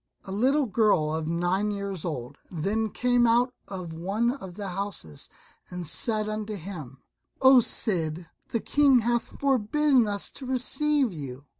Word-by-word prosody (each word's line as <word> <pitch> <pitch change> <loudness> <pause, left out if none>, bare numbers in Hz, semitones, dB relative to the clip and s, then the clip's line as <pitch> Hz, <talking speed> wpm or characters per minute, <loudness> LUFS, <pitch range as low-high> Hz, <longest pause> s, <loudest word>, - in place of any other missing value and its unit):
A 190 - -8
little 265 +8 +2
girl 205 -9 +2
of 160 -1 -2
nine 175 +5 0
years 200 -4 -4
old 130 -8 -5
then 205 +6 -1
came 245 +1 +2
out 240 +2 +3
of 180 -4 -6
one 200 +8 0
of 190 -10 -8
the 200 -1 -5
houses 180 - -5 0.4
and 180 -1 -6
said 215 +6 0
unto 215 0 -4
him, 155 -8 -8 0.4
"O 265 -1 +8
Cid, 170 -7 0 0.2
the 230 - -1
King 280 -4 +4
hath 235 +1 -2
forbidden 270 0 +3
us 200 -1 -2
to 265 - -9
receive 265 0 +1
you. 140 -3 -8
205 Hz, 150 wpm, -27 LUFS, 175-245 Hz, 0.4 s, O